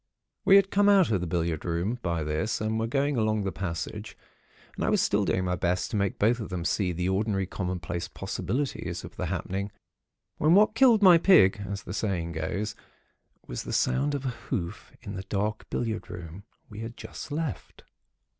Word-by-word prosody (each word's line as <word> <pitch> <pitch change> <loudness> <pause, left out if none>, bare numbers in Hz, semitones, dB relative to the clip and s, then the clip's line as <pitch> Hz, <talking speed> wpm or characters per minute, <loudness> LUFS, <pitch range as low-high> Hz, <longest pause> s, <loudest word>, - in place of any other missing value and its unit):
"We 195 0 +7
had 195 -1 +5
come 205 +1 +4
out 195 - +5
of 95 -5 +1
the 90 - -2
billiard 85 -2 -1
room, 90 +8 -1
by 85 -4 -1
this, 75 +8 -1
and 110 +1 -1
were 115 - 0
going 140 +2 0
along 110 -2 +1
the 95 - -1
passage; 95 +4 -5 0.6
and - - -3
I - - +2
was - - +3
still - - +2
doing 95 - 0
my 90 0 0
best 90 0 -1
to - - -2
make 100 -2 0
both 115 +4 +3
of 110 - -5
them 90 -3 -4
see 95 -1 +1
the 90 +1 -2
ordinary, 95 0 0
commonplace 90 -2 -4
possibilities 130 - -3
of - - -10
the - - -3
happening, 100 +2 -3 0.7
when 155 +4 +5
what 210 +2 +5
killed 225 -3 +5
my 180 -3 +8
pig, 110 - +5
as 100 -1 -4
the 90 - -6
saying 90 -6 -1
goes, 90 +6 -3 0.7
was - - -5
the - - -6
sound 145 +2 +1
of 140 -1 -4
a - - +1
hoof 105 -6 -5
in 100 - -6
the 95 - -4
dark 105 +3 -3
billiard 110 -2 -3
room, 90 +3 -8 0.2
we 105 - -10
had 115 +1 -7
just - - -8
left. 150 - -4
105 Hz, 195 wpm, -27 LUFS, 90-125 Hz, 0.7 s, my